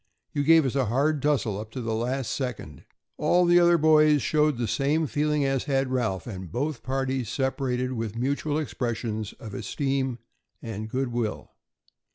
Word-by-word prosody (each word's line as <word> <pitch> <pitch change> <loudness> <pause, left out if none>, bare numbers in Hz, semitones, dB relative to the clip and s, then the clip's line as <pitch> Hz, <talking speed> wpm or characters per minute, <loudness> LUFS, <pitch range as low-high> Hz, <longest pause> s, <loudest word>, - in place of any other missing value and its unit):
You 145 - 0
gave 160 0 +6
us 130 - -1
a 135 -2 +1
hard 140 +6 +1
tussle 130 -9 +1
up 110 0 -7
to 130 - -4
the 115 -2 -2
last 125 +2 -2
second." 120 - -5 0.3
All 180 0 +3
the 175 0 +6
other 175 0 +5
boys 155 -2 +5
showed 150 -3 +2
the 120 -1 -1
same 140 +8 +1
feeling 150 0 0
as 135 -1 0
had 135 -2 0
Ralph, 110 -8 -1
and 95 -7 -7
both 140 - -2
parties 130 -2 -2
separated 130 -1 -1
with 115 -3 -4
mutual 140 +4 -1
expressions 115 -7 -3
of 110 -3 -10
esteem 135 0 -2 0.4
and 110 -1 -6
good 130 +2 -1
will. 120 -3 -3
130 Hz, 170 wpm, -26 LUFS, 115-145 Hz, 0.4 s, gave